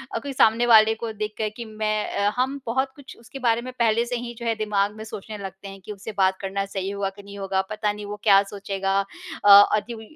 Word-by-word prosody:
अ, 230 - 0
कोई 280 +3 -6
सामने 230 -1 +4
वाले 220 -2 +6
को 225 0 -5
देखकर 215 0 -3
कि 235 - -6
मैं 215 -1 -2
अ, 200 +1 +2
हम 265 +3 -1
बहुत 265 +3 0
कुछ 280 -2 -12
उसके 255 +4 -11
बारे 235 -2 +2
में 255 +1 -7
पहले 230 0 +3
से 245 - -3
ही 240 0 -6
जो 235 - -6
है 230 -1 +1
दिमाग़ 210 -1 0
में 220 - -8
सोचने 215 0 -8
लगते 195 0 -8
हैं 195 0 -10
कि - - -7
उससे 210 +2 -7
बात 190 -1 +3
करना 195 0 -2
सही 195 -1 -4
होगा 200 -1 -2
कि 200 +1 -14
नहीं 200 0 -11
होगा, 195 -1 0
पता 210 0 -1
नहीं 210 0 -8
वो 205 0 -5
क्या 200 -2 +6
सोचेगा 195 -1 -1 0.5
अ, - - +6 0.3
अदि 215 +3 -3
उम, 225 - -9
215 Hz, 250 wpm, -24 LUFS, 200-230 Hz, 0.5 s, वाले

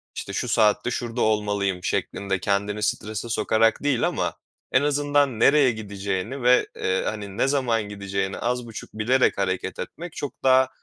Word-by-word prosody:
işte, - - -5
şu - - -2
saatte 110 +2 +2
şurada 120 -1 -3
olmalıyım, 100 -4 0
şeklinde 95 +1 -1
kendini 100 +3 -1
strese 110 +2 -2
sokarak 115 +2 +2
değil 135 -5 +2
ama - - -1 0.4
en 130 - +4
azından 145 -3 +1
nereye 140 0 +5
gideceğini 100 +3 -4
ve, 125 +1 +5
eee, 95 0 0
hani, 105 -1 -5
ne 135 - +2
zaman 125 -6 +1
gideceğini 100 -1 -3
az 125 0 -1
buçuk 110 - -9
bilerek 120 +4 +2
hareket 95 -1 -2
etmek 175 0 -7
çok 145 - -5
daha 130 0 +5
110 Hz, 155 wpm, -24 LUFS, 100-130 Hz, 0.4 s, nereye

